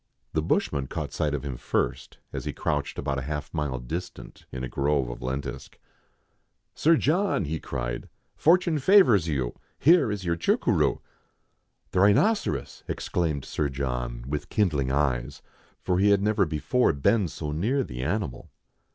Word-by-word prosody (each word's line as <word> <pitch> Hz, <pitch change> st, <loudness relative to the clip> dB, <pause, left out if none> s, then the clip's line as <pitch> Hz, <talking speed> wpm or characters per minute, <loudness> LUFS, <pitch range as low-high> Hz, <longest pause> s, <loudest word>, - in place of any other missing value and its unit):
The -, -, +1 dB
bushman 70 Hz, -2 st, 0 dB
caught -, -, -5 dB
sight 75 Hz, -1 st, 0 dB
of 70 Hz, -, -5 dB
him 65 Hz, -3 st, -4 dB
first, -, -, -2 dB, 0.2 s
as -, -, -4 dB
he -, -, -3 dB
crouched 75 Hz, -1 st, -2 dB
about 70 Hz, -2 st, -2 dB
half 75 Hz, +1 st, -5 dB
a -, -, -4 dB
mile 75 Hz, -4 st, -1 dB
distant 85 Hz, +9 st, -7 dB
in 65 Hz, 0 st, -5 dB
a -, -, -2 dB
grove 70 Hz, -1 st, 0 dB
of -, -, -9 dB
lentisk. 65 Hz, +3 st, -5 dB, 1.0 s
Sir 165 Hz, +1 st, +4 dB
John," 165 Hz, -, +1 dB
he 80 Hz, +2 st, -3 dB
cried, -, -, -4 dB
" -, -, -46 dB
fortune 170 Hz, -1 st, +3 dB
favours 130 Hz, -, +5 dB
you: 65 Hz, -6 st, -1 dB, 0.2 s
here 165 Hz, -6 st, +5 dB
is 100 Hz, -3 st, -4 dB
your 85 Hz, -1 st, +1 dB
chucuroo!" 85 Hz, -, +1 dB, 0.9 s
"The 90 Hz, -, +1 dB
rhinoceros!" 105 Hz, -, +2 dB
exclaimed 80 Hz, -6 st, -2 dB
Sir 75 Hz, -, -1 dB
John, 60 Hz, -3 st, -3 dB
with 75 Hz, +1 st, -4 dB
kindling 75 Hz, -11 st, +1 dB
eyes, 70 Hz, -1 st, -1 dB, 0.4 s
for 90 Hz, -1 st, +1 dB
he 100 Hz, +1 st, +4 dB
had 100 Hz, -1 st, +4 dB
never 105 Hz, -3 st, +2 dB
before 85 Hz, -, +1 dB
been 90 Hz, +8 st, +2 dB
so 75 Hz, -1 st, -5 dB
near 115 Hz, -, 0 dB
the 60 Hz, -, -6 dB
animal. 75 Hz, -, -3 dB
75 Hz, 160 wpm, -26 LUFS, 70-105 Hz, 1.0 s, favours